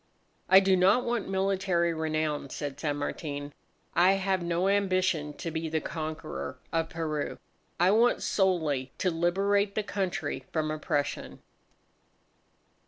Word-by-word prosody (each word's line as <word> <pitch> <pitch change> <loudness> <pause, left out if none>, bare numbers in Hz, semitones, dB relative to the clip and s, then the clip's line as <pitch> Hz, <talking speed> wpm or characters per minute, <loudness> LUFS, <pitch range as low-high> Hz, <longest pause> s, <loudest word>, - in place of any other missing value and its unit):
"I 190 - +9
do 190 -1 +3
not 195 +7 +4
want 235 -5 -1
military 190 -3 +1
renown," 155 -2 -1
said 145 0 -5
San 145 -2 -1
Martin, 145 -1 -4 0.4
"I 180 +3 +5
have 195 -1 0
no 170 +2 0
ambition 185 -6 +1
to 165 - -5
be 160 0 -3
the 160 0 0
conqueror 155 0 -5 0.2
of 165 0 0
Peru. 155 -3 -3 0.4
I 180 +2 +5
want 230 +3 +3
solely 160 -9 +1
to 185 - +1
liberate 195 +4 +1
the 215 - 0
country 180 -10 -2
from 155 -1 -1
oppression." 145 -2 -3
170 Hz, 130 wpm, -29 LUFS, 155-190 Hz, 0.4 s, I